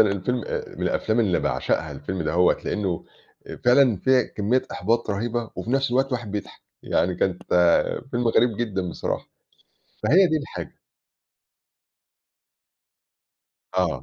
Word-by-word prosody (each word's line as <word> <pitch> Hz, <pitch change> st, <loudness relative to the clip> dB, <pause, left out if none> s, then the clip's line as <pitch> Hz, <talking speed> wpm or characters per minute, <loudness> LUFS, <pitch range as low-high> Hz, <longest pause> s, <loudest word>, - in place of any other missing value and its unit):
الفيلم 105 Hz, +4 st, +1 dB
آآ -, -, -4 dB
من -, -, -6 dB
الأفلام 110 Hz, +2 st, +1 dB
اللي 95 Hz, -6 st, +2 dB
باعشقها، 80 Hz, -2 st, -1 dB
الفيلم 80 Hz, +6 st, -4 dB
دهوّة، 85 Hz, +3 st, +3 dB
لإنه 95 Hz, -5 st, -2 dB, 0.4 s
آآ -, -, -7 dB
فعلًا 125 Hz, -2 st, +5 dB
فيه 130 Hz, +7 st, +3 dB, 0.2 s
كمية 110 Hz, +5 st, +2 dB
إحباط 115 Hz, +3 st, 0 dB
رهيبة، 115 Hz, +2 st, -2 dB
وفي 115 Hz, -, -4 dB
نَفْس 135 Hz, 0 st, +1 dB
الوقت 130 Hz, +2 st, +2 dB
الواحد 120 Hz, -6 st, -4 dB
بيضحك، 105 Hz, -1 st, -6 dB, 0.2 s
يعني 90 Hz, +2 st, +1 dB
كانت 90 Hz, 0 st, -1 dB, 0.7 s
فيلم 120 Hz, -1 st, 0 dB
غريب 115 Hz, -1 st, +3 dB
جدًا 95 Hz, -6 st, -2 dB
بصراحة، -, -, -4 dB, 0.8 s
فهي 185 Hz, +6 st, +5 dB
دي 155 Hz, -1 st, +1 dB
الحاجة. 145 Hz, -, -7 dB, 3.0 s
آه. 85 Hz, -8 st, 0 dB
110 Hz, 130 wpm, -24 LUFS, 95-125 Hz, 3.0 s, فعلًا